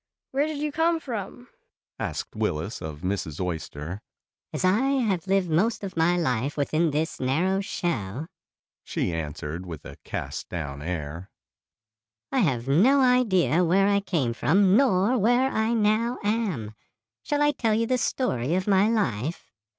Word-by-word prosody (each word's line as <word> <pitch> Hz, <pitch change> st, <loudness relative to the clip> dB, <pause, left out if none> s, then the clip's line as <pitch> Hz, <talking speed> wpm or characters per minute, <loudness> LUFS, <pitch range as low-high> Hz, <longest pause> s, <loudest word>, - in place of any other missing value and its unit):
"Where 280 Hz, +3 st, +1 dB
did 310 Hz, -2 st, -4 dB
you 300 Hz, +1 st, -2 dB
come 325 Hz, +2 st, +2 dB
from?" 245 Hz, -3 st, -6 dB, 0.5 s
asked -, -, -4 dB
Willis 105 Hz, -2 st, -2 dB
of 75 Hz, -1 st, -7 dB
Mrs. 90 Hz, -5 st, -3 dB
Oyster. 85 Hz, 0 st, -4 dB, 0.5 s
"As -, -, -2 dB
I 185 Hz, +4 st, +4 dB
have 245 Hz, -10 st, 0 dB
lived 190 Hz, -3 st, +1 dB
most 210 Hz, +8 st, +1 dB
of 190 Hz, -1 st, -5 dB
my 165 Hz, +2 st, +3 dB
life 135 Hz, -3 st, -1 dB
within 155 Hz, +3 st, +1 dB
this 155 Hz, +3 st, -2 dB
narrow 175 Hz, +10 st, +1 dB
shell," 155 Hz, -, -3 dB, 0.6 s
she 85 Hz, -, -2 dB
answered 80 Hz, +1 st, -4 dB
with 85 Hz, -5 st, -8 dB
a -, -, -10 dB
cast -, -, -5 dB
down 70 Hz, 0 st, -5 dB
air, 85 Hz, +2 st, -5 dB, 1.0 s
"I 270 Hz, -, +1 dB
have 130 Hz, -, +1 dB
no 215 Hz, -, +5 dB
idea 210 Hz, -, +3 dB
where 190 Hz, +3 st, +3 dB
I 200 Hz, 0 st, +3 dB
came 165 Hz, -12 st, -1 dB
from 185 Hz, -, +3 dB
nor 235 Hz, -1 st, +3 dB
where 245 Hz, +5 st, +3 dB
I 220 Hz, +2 st, +1 dB
now 225 Hz, +3 st, +2 dB
am. 205 Hz, -, -1 dB, 0.5 s
Shall 295 Hz, 0 st, 0 dB
I 295 Hz, -, +4 dB
tell 225 Hz, -6 st, 0 dB
you 230 Hz, +1 st, +1 dB
the 255 Hz, +2 st, +1 dB
story 160 Hz, -, 0 dB
of 185 Hz, 0 st, 0 dB
my 200 Hz, +1 st, +4 dB
life?" 160 Hz, -, -1 dB
185 Hz, 155 wpm, -26 LUFS, -, 1.0 s, no